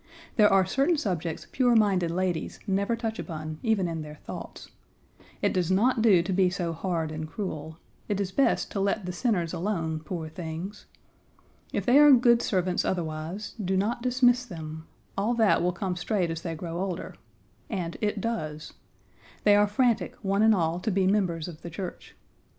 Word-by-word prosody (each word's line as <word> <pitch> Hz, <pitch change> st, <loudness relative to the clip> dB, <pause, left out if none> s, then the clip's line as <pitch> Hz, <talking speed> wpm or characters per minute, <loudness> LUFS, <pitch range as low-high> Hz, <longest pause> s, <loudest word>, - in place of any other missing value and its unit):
There 210 Hz, -2 st, +5 dB
are 195 Hz, -1 st, +5 dB
certain 275 Hz, -, +2 dB
subjects 175 Hz, -, -3 dB
pure 245 Hz, -2 st, +3 dB
minded 195 Hz, -6 st, +3 dB
ladies 175 Hz, -1 st, -2 dB
never 200 Hz, +3 st, +1 dB
touch 225 Hz, -1 st, -4 dB
upon, 155 Hz, -2 st, -6 dB
even 220 Hz, -6 st, +1 dB
in 165 Hz, -1 st, -3 dB
their 150 Hz, 0 st, -8 dB
thoughts. -, -, -9 dB, 0.7 s
It -, -, +2 dB
does 180 Hz, -2 st, 0 dB
not 225 Hz, +6 st, +3 dB
do 200 Hz, -7 st, +5 dB
to 190 Hz, +2 st, -2 dB
be 185 Hz, 0 st, +4 dB
so 175 Hz, -3 st, -2 dB
hard 165 Hz, -2 st, -2 dB
and 155 Hz, 0 st, -5 dB
cruel. 160 Hz, -4 st, -5 dB, 0.3 s
It 205 Hz, -1 st, 0 dB
is 195 Hz, -2 st, -2 dB
best 255 Hz, +3 st, +1 dB
to 200 Hz, -, -2 dB
let 200 Hz, 0 st, 0 dB
the 180 Hz, -, -3 dB
sinners 180 Hz, -4 st, 0 dB
alone, 165 Hz, -4 st, -2 dB
poor 160 Hz, 0 st, -5 dB
things. 165 Hz, +5 st, -7 dB, 0.8 s
If -, -, -2 dB
they 260 Hz, +2 st, +6 dB
are 295 Hz, 0 st, +8 dB
good 240 Hz, -1 st, +5 dB
servants 185 Hz, -4 st, 0 dB
otherwise, 165 Hz, +3 st, -3 dB
do 190 Hz, +1 st, 0 dB
not 220 Hz, +5 st, 0 dB
dismiss 250 Hz, 0 st, +3 dB
them; 160 Hz, -7 st, -8 dB, 0.3 s
all 215 Hz, +5 st, 0 dB
that 220 Hz, -3 st, +4 dB
will 180 Hz, +1 st, +2 dB
come 180 Hz, +1 st, -3 dB
straight 180 Hz, -1 st, -1 dB
as 165 Hz, 0 st, -4 dB
they 165 Hz, -2 st, -4 dB
grow 170 Hz, +1 st, -5 dB
older, 185 Hz, -2 st, -3 dB, 0.6 s
and 180 Hz, -6 st, -3 dB
it 210 Hz, -1 st, 0 dB
does! 155 Hz, -9 st, -4 dB, 0.7 s
They 205 Hz, -1 st, +6 dB
are 205 Hz, 0 st, +5 dB
frantic, 235 Hz, +2 st, +1 dB
one 200 Hz, +1 st, +1 dB
and 220 Hz, 0 st, +6 dB
all, 165 Hz, -1 st, 0 dB
to 220 Hz, -, -2 dB
be 195 Hz, -1 st, +2 dB
members 185 Hz, -5 st, +1 dB
of 165 Hz, -3 st, -9 dB
the 170 Hz, -, -7 dB
church. 180 Hz, +2 st, -7 dB
185 Hz, 180 wpm, -27 LUFS, 165-215 Hz, 0.8 s, are